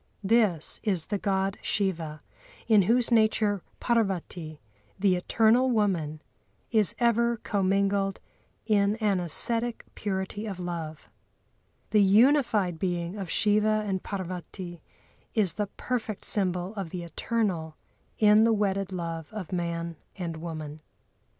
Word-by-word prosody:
This 200 -6 +2
is 185 -7 0
the 205 - -2
God 195 -1 -1
Shiva, 165 -7 -2 0.4
in 215 -3 +6
whose 235 +6 +2
nature 215 -3 +3 0.2
Parvati, 185 -8 -1 0.4
the 195 -1 +3
eternal 225 +7 +3
Woman, 175 -10 0 0.5
is 215 -5 +4
ever 235 0 +2
commingled 195 -1 0 0.5
in 205 -2 +2
an 210 -4 +1
ascetic 230 +8 +2
purity 200 +1 -3
of 195 -3 -5
love. 165 -4 -5 0.8
The 210 -1 +5
unified 210 - +4
being 175 -1 -2
of 195 -4 -5
Shiva 215 +2 +2
and 190 -2 -2
Parvati 180 -2 -6 0.5
is 205 -6 +2
the 210 -1 -2
perfect 225 -5 -3
symbol 185 -1 0
of 195 -5 -5
the 175 0 -5
eternal 170 -4 -2 0.4
in 210 0 +6
the 230 0 +4
wedded 195 -2 0
love 165 -3 -5
of 210 -6 -7
man 170 -1 -3 0.2
and 170 -3 -5
woman. 155 -2 -6
195 Hz, 120 wpm, -27 LUFS, 175-215 Hz, 0.8 s, in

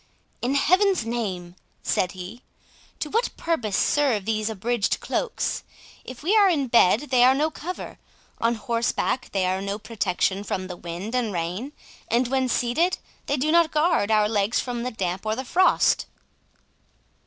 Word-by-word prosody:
"In 255 +3 0
Heaven's 370 - +3
name," 190 -7 -4 0.3
said 180 - 0
he, 185 +6 -9 0.6
"to - - -2
what 460 +3 +1
purpose 245 - -1
serve 260 -9 +2
these 215 0 -1
abridged 220 0 -1
cloaks? - - -2 0.4
If 255 +2 -10
we 385 +7 +2
are 410 -3 +6
in 285 -7 0
bed 235 +4 +4
they 250 -2 +5
are 260 +1 +6
no 305 +3 +1
cover, 355 +4 -7 0.4
on 230 +1 +2
horseback 235 +3 -1
they 190 -2 0
are 185 +1 0
no 200 +1 -3
protection 205 -3 -1
from 185 -2 -3
the 180 -1 -7
wind 175 +6 -6
and 245 -4 0
rain, 185 - -3 0.3
and 240 +1 +2
when 260 -1 +1
seated, 260 +11 +1 0.3
they 285 - 0
do 300 +4 +1
not 335 -1 +5
guard 300 - +2
our 215 -1 +4
legs 210 +1 +1
from 245 -2 -3
the 250 - -2
damp 185 -5 -3
or 215 0 -1
the 260 +2 -5
frost." 365 +8 +3
235 Hz, 165 wpm, -24 LUFS, 200-280 Hz, 0.6 s, are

